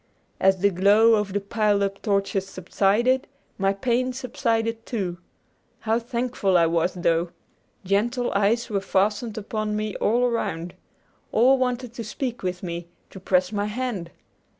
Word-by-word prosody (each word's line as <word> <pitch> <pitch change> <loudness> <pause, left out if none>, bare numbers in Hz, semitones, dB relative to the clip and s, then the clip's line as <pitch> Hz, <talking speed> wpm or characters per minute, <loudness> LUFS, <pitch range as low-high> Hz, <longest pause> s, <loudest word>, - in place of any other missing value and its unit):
As 190 0 +4
the 200 0 +4
glow 205 +5 +5
of 210 -2 +1
the 205 - 0
piled 205 0 +1
up 195 0 -3
torches 195 -2 0
subsided, 205 +8 +1 0.3
my 195 0 +3
pain 245 +5 0
subsided 230 -3 -1
too. 185 -8 -3 0.6
How 225 +1 +1
thankful 235 -5 0
I 170 - +5
was, 170 +2 +1
though! 170 -1 +1 0.6
Gentle 235 +6 0
eyes 210 +4 +1
were 200 -2 0
fastened 210 +3 0
upon 215 0 -3
me 215 -1 -3
all 235 +4 +2
around. 180 -8 -2 0.6
All 255 +4 +4
wanted 250 -2 -1
to 235 - -6
speak 240 +2 -4
with 180 0 -3
me, 170 -1 -5 0.2
to 190 - -10
press 185 0 +1
my 205 -1 -1
hand. 210 -5 -3
210 Hz, 150 wpm, -24 LUFS, 190-235 Hz, 0.6 s, glow